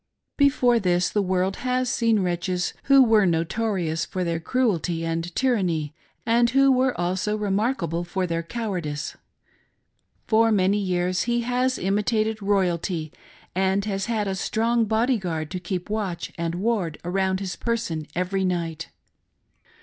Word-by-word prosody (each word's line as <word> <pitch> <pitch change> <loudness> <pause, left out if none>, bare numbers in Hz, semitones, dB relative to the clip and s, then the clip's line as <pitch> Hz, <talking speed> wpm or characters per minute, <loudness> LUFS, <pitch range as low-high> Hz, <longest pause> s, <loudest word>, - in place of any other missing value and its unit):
Before 260 -4 +3
this 180 -3 +1
the 210 - +1
world 185 0 0
has 255 0 0
seen 230 -3 +2
wretches 180 0 -1
who 275 -1 +7
were 220 -5 +4
notorious 170 0 0
for 185 - -3
their 170 -1 -1
cruelty 175 -6 0
and 165 +1 -3
tyranny, 180 - 0 0.3
and 235 +1 +3
who 275 +2 +4
were 255 -3 +2
also 185 +4 0
remarkable 200 - -1
for 185 +2 -2
their 165 -1 -1
cowardice. 170 -7 -4 1.1
For 225 0 +3
many 200 0 +3
years 180 -1 0
he 240 0 +2
has 250 +2 0
imitated 215 +3 0
royalty 180 -5 0 0.4
and 190 +2 +1
has 195 -1 -2
had 220 -3 -1
a 195 - -1
strong 225 +4 +1
body 225 +3 +1
guard 160 -4 -4
to 185 - -3
keep 180 0 -4
watch 205 -5 -3
and 170 0 -2
ward 190 -5 -1
around 190 +1 0
his 190 -2 -4
person 225 -10 -2
every 185 +2 0
night. 170 -4 -2
195 Hz, 140 wpm, -24 LUFS, 175-225 Hz, 1.1 s, who